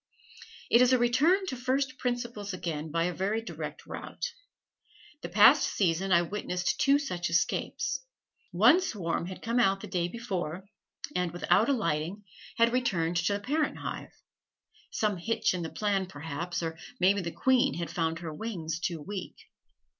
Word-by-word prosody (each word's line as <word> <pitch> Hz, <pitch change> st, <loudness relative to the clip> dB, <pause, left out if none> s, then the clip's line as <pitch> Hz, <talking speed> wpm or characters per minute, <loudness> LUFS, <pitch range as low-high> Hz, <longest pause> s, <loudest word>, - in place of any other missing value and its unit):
It 235 Hz, -, +7 dB
is 250 Hz, +1 st, +5 dB
a -, -, +6 dB
return 290 Hz, +11 st, +3 dB
to 310 Hz, -, -3 dB
first 260 Hz, +1 st, -1 dB
principles 240 Hz, -5 st, -3 dB
again 160 Hz, -3 st, -4 dB
by 165 Hz, +2 st, 0 dB
a 180 Hz, +1 st, 0 dB
very 200 Hz, +5 st, -1 dB
direct 225 Hz, -, -7 dB
route. -, -, -6 dB, 0.9 s
The -, -, -5 dB
past -, -, +7 dB
season 190 Hz, 0 st, 0 dB
I 170 Hz, -1 st, +5 dB
witnessed 180 Hz, -1 st, -2 dB
two 275 Hz, +1 st, +5 dB
such 180 Hz, -12 st, -3 dB
escapes. 320 Hz, -, 0 dB, 0.5 s
One 355 Hz, +4 st, +6 dB
swarm 175 Hz, -, -2 dB
had 185 Hz, -, -8 dB
come 235 Hz, +2 st, +1 dB
out 195 Hz, -4 st, +3 dB
the -, -, -6 dB
day 175 Hz, -2 st, -1 dB
before, 190 Hz, -5 st, -4 dB, 0.5 s
and, 180 Hz, -1 st, 0 dB
without 180 Hz, -, +2 dB
alighting, 175 Hz, -, -1 dB, 0.3 s
had 230 Hz, +1 st, +4 dB
returned 175 Hz, -9 st, +1 dB
to 175 Hz, +4 st, +1 dB
the 200 Hz, -, -1 dB
parent 295 Hz, +8 st, -1 dB
hive -, -, -5 dB, 0.8 s
some 210 Hz, -3 st, 0 dB
hitch 225 Hz, +4 st, 0 dB
in 180 Hz, -, -3 dB
the 165 Hz, -, -4 dB
plan, 200 Hz, -1 st, 0 dB
perhaps, 165 Hz, +1 st, -4 dB
or 160 Hz, 0 st, -4 dB, 0.2 s
may 190 Hz, +2 st, +5 dB
be 200 Hz, -, -2 dB
the 170 Hz, -, -3 dB
queen 260 Hz, +5 st, +2 dB
had 170 Hz, -2 st, -4 dB
found 165 Hz, -1 st, -1 dB
her 165 Hz, -2 st, -6 dB
wings 165 Hz, -5 st, -4 dB
too 170 Hz, -1 st, -2 dB
weak. 195 Hz, +1 st, -6 dB
195 Hz, 165 wpm, -29 LUFS, 170-240 Hz, 0.9 s, It